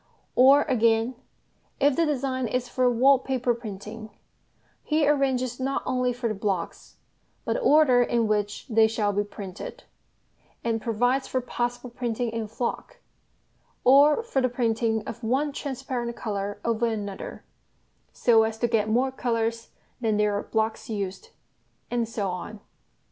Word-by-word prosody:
Or 270 Hz, +3 st, +7 dB
again, 230 Hz, -2 st, +2 dB, 0.7 s
if 285 Hz, -1 st, +3 dB
the 335 Hz, -1 st, +2 dB
design 260 Hz, -3 st, -1 dB
is 250 Hz, +2 st, -2 dB
for 255 Hz, 0 st, +2 dB
wall 260 Hz, +3 st, +5 dB
paper 255 Hz, -2 st, 0 dB
printing, 215 Hz, -1 st, -8 dB, 0.7 s
he 305 Hz, -1 st, +1 dB
arranges 265 Hz, -4 st, +1 dB
not 270 Hz, +1 st, -1 dB
only 250 Hz, -1 st, +1 dB
for 245 Hz, 0 st, -3 dB
the 220 Hz, -, -1 dB
blocks, 195 Hz, -3 st, -3 dB, 0.5 s
but -, -, 0 dB
the -, -, -1 dB
order 295 Hz, -, +5 dB
in 235 Hz, -1 st, +1 dB
which 210 Hz, -1 st, -1 dB
they 225 Hz, -3 st, +4 dB
shall 215 Hz, -2 st, 0 dB
be 205 Hz, +1 st, +1 dB
printed; 200 Hz, -3 st, -8 dB, 0.8 s
and 225 Hz, -1 st, -1 dB
provides 245 Hz, +4 st, +1 dB
for 260 Hz, -, -1 dB
possible 245 Hz, 0 st, -3 dB
printing 240 Hz, -1 st, -2 dB
in 225 Hz, -1 st, -3 dB
"flock," 240 Hz, -, -4 dB, 0.9 s
or 285 Hz, -, +6 dB
for 280 Hz, -, 0 dB
the 255 Hz, -, +2 dB
printing 225 Hz, -2 st, 0 dB
of 235 Hz, -, -7 dB
one 270 Hz, +6 st, +1 dB
transparent 260 Hz, -4 st, -4 dB
colour 205 Hz, -2 st, -4 dB
over 230 Hz, 0 st, +1 dB
another, 205 Hz, -3 st, -5 dB, 0.7 s
so 230 Hz, -2 st, +4 dB
as 220 Hz, 0 st, -1 dB
to 240 Hz, -, +1 dB
get 220 Hz, -2 st, +1 dB
more 250 Hz, +4 st, +2 dB
colours 230 Hz, -2 st, -2 dB, 0.3 s
than 220 Hz, -3 st, +1 dB
there 210 Hz, 0 st, +2 dB
are 205 Hz, -, -1 dB
blocks 220 Hz, 0 st, -2 dB
used, 200 Hz, -, -4 dB, 0.6 s
and 235 Hz, -2 st, 0 dB
so 205 Hz, -5 st, -2 dB
on. 195 Hz, +4 st, -7 dB
235 Hz, 150 wpm, -26 LUFS, 220-260 Hz, 0.9 s, Or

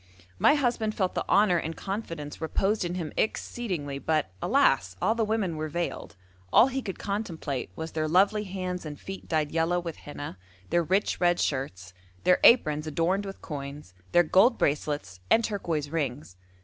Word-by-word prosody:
My 290 Hz, -, +6 dB
husband 235 Hz, -6 st, 0 dB
felt 185 Hz, -3 st, 0 dB
the -, -, -3 dB
honour 200 Hz, -3 st, +5 dB
and 160 Hz, +1 st, -4 dB
confidence 170 Hz, -8 st, -5 dB
reposed 195 Hz, +6 st, 0 dB
in 175 Hz, 0 st, -3 dB
him 165 Hz, -4 st, -4 dB
exceedingly, 175 Hz, -12 st, -2 dB
but, 155 Hz, -, 0 dB
alas! 95 Hz, 0 st, +3 dB
all 220 Hz, -, +2 dB
the 230 Hz, -1 st, 0 dB
women 210 Hz, -6 st, -1 dB
were 155 Hz, 0 st, -3 dB
veiled; 170 Hz, -9 st, -4 dB, 0.4 s
all 255 Hz, -, +7 dB
he 265 Hz, +1 st, -2 dB
could 195 Hz, -6 st, -5 dB
contemplate 170 Hz, -, -3 dB
was 160 Hz, 0 st, -5 dB
their 155 Hz, -1 st, -1 dB
lovely 200 Hz, +6 st, +3 dB
hands 185 Hz, -2 st, -4 dB
and 150 Hz, -2 st, -7 dB
feet 195 Hz, 0 st, -8 dB
dyed 155 Hz, -3 st, 0 dB
yellow 165 Hz, +2 st, +1 dB
with 170 Hz, -2 st, -6 dB
henna, 145 Hz, -9 st, -8 dB, 0.3 s
their 175 Hz, +1 st, +4 dB
rich 190 Hz, +5 st, 0 dB
red 175 Hz, 0 st, +3 dB
shirts, 95 Hz, -10 st, -2 dB, 0.3 s
their 180 Hz, -, +4 dB
aprons 155 Hz, -10 st, +5 dB
adorned 180 Hz, +6 st, 0 dB
with 195 Hz, -, -9 dB
coins, 140 Hz, -, -7 dB, 0.2 s
their 175 Hz, 0 st, +6 dB
gold 190 Hz, +9 st, +4 dB
bracelets 145 Hz, -10 st, -1 dB
and 230 Hz, -, +5 dB
turquoise 170 Hz, -9 st, -2 dB
rings. 140 Hz, -, -3 dB
170 Hz, 170 wpm, -27 LUFS, 150-195 Hz, 0.4 s, all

